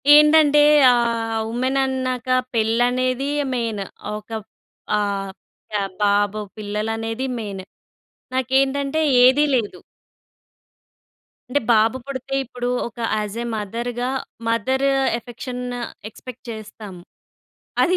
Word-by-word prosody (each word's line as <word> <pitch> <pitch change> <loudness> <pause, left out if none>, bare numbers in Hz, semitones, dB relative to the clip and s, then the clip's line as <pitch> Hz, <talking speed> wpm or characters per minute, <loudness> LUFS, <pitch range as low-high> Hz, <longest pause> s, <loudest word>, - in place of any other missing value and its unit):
ఏంటంటే 300 -1 +6 0.3
ఆహ్, 230 -2 +1
ఉమెన్ 255 +3 0
అన్నాక 255 -2 -2 0.3
పెళ్ళనేది 245 +4 +1 0.2
మెయిన్. 225 -5 -2 0.3
ఒక 210 +1 -9 0.7
ఆహ్, 200 -2 -1 0.4
క - - -14 0.3
బాబు 205 +1 +2 0.2
పిల్లలనేది 225 +3 -3
మెయిన్ 200 -4 -5 0.7
నాకేంటంటే 270 +3 +1 0.2
ఏదీ 260 +4 +6
లేదు. 220 -4 -1 1.7
అంటే. 285 - +2
బాబు 225 +2 +4
పుడితే 270 0 -5
ఇప్పుడు, 245 0 -4 0.2
ఒక 235 - -20 0.2
యాజే 215 +3 -3
మదర్‌గా, 235 +4 -3 0.4
మదర్ 260 +4 +1 0.3
ఎఫెక్షన్ 245 +1 -7 0.5
ఎక్సపెక్ట్ 250 +3 -11
చేస్తాం. 215 -2 -9 0.9
అది 365 +1 +2
240 Hz, 90 wpm, -22 LUFS, 215-260 Hz, 1.7 s, ఏంటంటే